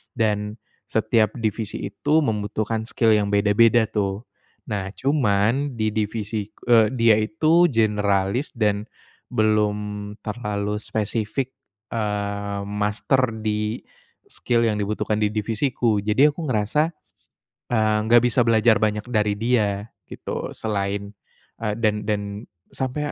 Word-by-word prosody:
dan 105 -1 0 0.3
setiap 110 -2 +1
divisi 110 -2 -3
itu 155 +2 +2
membutuhkan 110 -1 -2
skill 115 -4 +2
yang 105 -1 +3
beda-beda 105 +3 +4
tuh. 100 0 -1 0.5
Nah, 100 -2 -2
cuman 130 0 +1
di 110 -1 0
divisi 105 0 -2
k - - -29
eee, 115 -2 +6
dia 115 -3 +5
itu 160 +9 +3
generalis 105 +2 +1
dan 105 -2 0 0.5
belum 105 -1 0
terlalu 105 -1 -3
spesifik, 110 +4 -2 0.4
eee, 100 -2 -2
master 105 +5 0
di 105 +1 -2 0.5
skill 120 -1 0
yang 105 - -1
dibutuhkan 105 +1 -1
di 105 0 0
divisiku, 115 +1 0
jadi 130 +8 +5
aku 160 +2 -5
ngerasa, 145 +7 +1 0.7
eee, 110 -2 +2
nggak 120 +1 +6
bisa 125 +1 +2
belajar 110 -1 +4
banyak 105 0 0
dari 105 -2 +1
dia 105 -3 +1 0.2
gitu - - -6
selain, 100 -1 -2 0.5
eee, 105 -2 -2
dan 105 -2 0
dan 105 -1 0 0.5
sampai 145 +3 -3
110 Hz, 120 wpm, -23 LUFS, 105-115 Hz, 0.7 s, eee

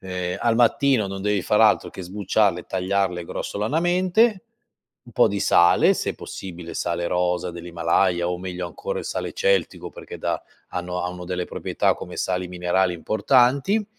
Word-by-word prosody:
ehm, 90 -1 -4
al 115 -1 +2
mattino 120 -1 +3
non 95 0 -6
devi 105 -1 0
far 105 +1 +2
altro 110 -2 +4
che - - -9
sbucciarle, 95 0 0
tagliarle 95 -2 -1
grossolanamente; 180 - +1 0.6
un 120 - -15
po' - - +4
di 100 0 -3
sale, 85 0 +5
se - - -2
possibile 85 -3 -8
sale 85 0 -2
rosa 90 0 0
dell'Himalaya 85 +1 0
o 90 - -3
meglio 90 -1 -5
ancora 480 - -5
il - - -9
sale - - -4
celtico - - 0
perché 475 -2 -10
dà - - -2 0.3
hanno 90 0 -4
hanno 90 0 -5
delle 90 0 -2
proprietà - - 0
come - - -9
sali 90 -1 -2
minerali 90 +1 0
importanti; 130 - +2
95 Hz, 155 wpm, -23 LUFS, 90-120 Hz, 0.6 s, sale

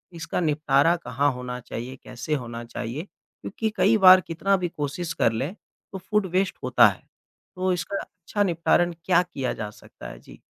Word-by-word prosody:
इसका 165 +1 -3
निपटारा 155 0 +3
कहाँ 140 0 0
होना 125 0 -6
चाहिए? 125 +2 -7
कैसे 125 +4 -6
होना 120 -3 -6
चाहिए? 120 +5 -5
क्योंकि 215 +2 -6
कई 215 +3 +4
बार 185 0 +10
कितना 175 +5 0
भी 180 -1 -2
कोशिश 160 +2 -4
कर 115 - +2
लें 135 +10 -3 0.4
तो 195 - -5
फूड 210 +2 0
वेस्ट 190 0 0
होता 125 -3 +6
है। 95 - -3 0.5
तो 185 0 0
इसका 190 +3 -3
अच्छा 195 +3 -3
निपटारण 175 -1 +2
क्या 180 -1 +4
किया 135 -8 -4
जा 105 - -5
सकता - - -13
है? - - -11
जी। - - -15
160 Hz, 175 wpm, -25 LUFS, 125-180 Hz, 0.5 s, बार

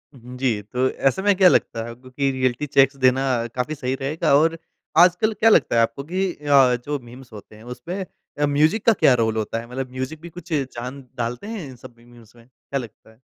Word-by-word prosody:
हुँ 125 0 -11
जी, 125 -5 0
तो 125 +5 -1
ऐसे 135 +7 0
में 205 0 +3
क्या 185 -1 +7
लगता 115 -8 0
है, 120 - -7
क्योंकि 130 +3 -3
रिऐलिटी 130 +1 -1
चेक्स 135 -1 +3
देना 130 0 +3 0.3
काफ़ी 130 +5 -2
सही 130 -3 -3
रहेगा 150 +3 -1
और 165 +3 +3 0.4
आजकल 180 +5 +4
क्या 225 +1 +3
लगता 215 - +3
है 115 - +5
आपको 115 +4 -1
कि 185 +5 -2
अ, 140 -4 +3
जो 145 0 -2
मीम्स 125 +1 -14
होते 105 0 -12
हैं, 110 - -15
उसमें 165 +11 -6 0.3
अ, 145 - +3
म्यूज़िक 155 +9 +1
का 230 - +6
क्या 140 - +4
रोल 110 -2 +1
होता 110 +1 -2
है? 115 - -10
मतलब 130 0 -5
म्यूज़िक 130 +5 -5
भी 170 - -9
कुछ 170 0 -9
जान 130 -1 -4 0.2
डालते 120 - -4
हैं 215 -7 -6
इन 130 - -11
सब 125 0 -14
मीम्स 120 -1 -19
में? 115 -1 -19
क्या 135 +2 -6
लगता 110 -2 -12
है? 110 - -25
130 Hz, 220 wpm, -22 LUFS, 120-155 Hz, 0.4 s, क्या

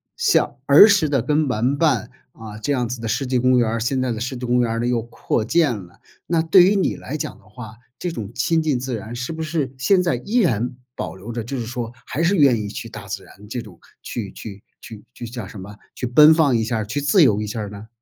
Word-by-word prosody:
像 - - +2
儿 145 +10 +9
时 190 -8 +3
的 135 -5 +1
跟 150 0 +1
玩 125 +5 0
伴 150 -6 +1 0.2
啊， 110 -3 -10
这 125 +7 -3
样 125 -4 0
子 120 0 -6
的 115 - -4
湿 135 +5 -1
地 125 0 0
公 125 +1 +3
园 115 - +2
儿， 115 +1 -2
现 130 +2 0
在 125 -2 -1
的 110 - -5
湿 125 +1 -3
地 125 - -5
公 125 0 +2
园 115 -2 0
儿 115 - -2
呢 120 - -1
又 120 -2 +1
扩 115 0 -2
建 145 +1 +2
了。 90 -4 -12 0.3
那 165 -1 +1
对 165 +3 +6
于 195 +3 +3
你 190 - 0
来 150 - -6
讲 - - -5
的 - - -23
话， 110 0 -10 0.3
这 180 - -2
种 110 -8 -6
亲 160 +6 +1
近 150 -5 0
自 130 0 -3
然 110 +2 -7
是 125 +6 -4
不 160 0 -4
是 155 -5 -2
现 185 +8 +3
在 170 -7 0
依 205 - -2
然 125 - +1 0.2
保 - - -5
留 110 +5 -8
着， 115 -2 -3
就 135 +4 -5
是 115 - -3
说， 120 -1 -5
还 155 - -2
是 185 +3 +2
愿 140 -5 +5
意 105 - -5
去 - - -7
大 - - -10
自 - - -6
然 105 +2 -16
这 120 - -4
种 100 -7 -14 0.2
去 105 -5 -5
去 100 -2 -10 0.2
去 105 -2 -11
去 120 - -8
叫 120 0 -6
什 105 - -10
么？ 100 +2 -10 0.2
去 125 - -3
奔 150 +6 +7
放 150 -6 +3
一 115 - +1
下 115 +1 -1
儿， 110 - -2
去 145 +7 -2
自 145 +6 +4
由 105 -7 +3
一 105 - -4
下 110 +2 -5
儿 105 - -4
呢？ 105 +2 -10
125 Hz, 290 characters per minute, -21 LUFS, 110-150 Hz, 0.3 s, 儿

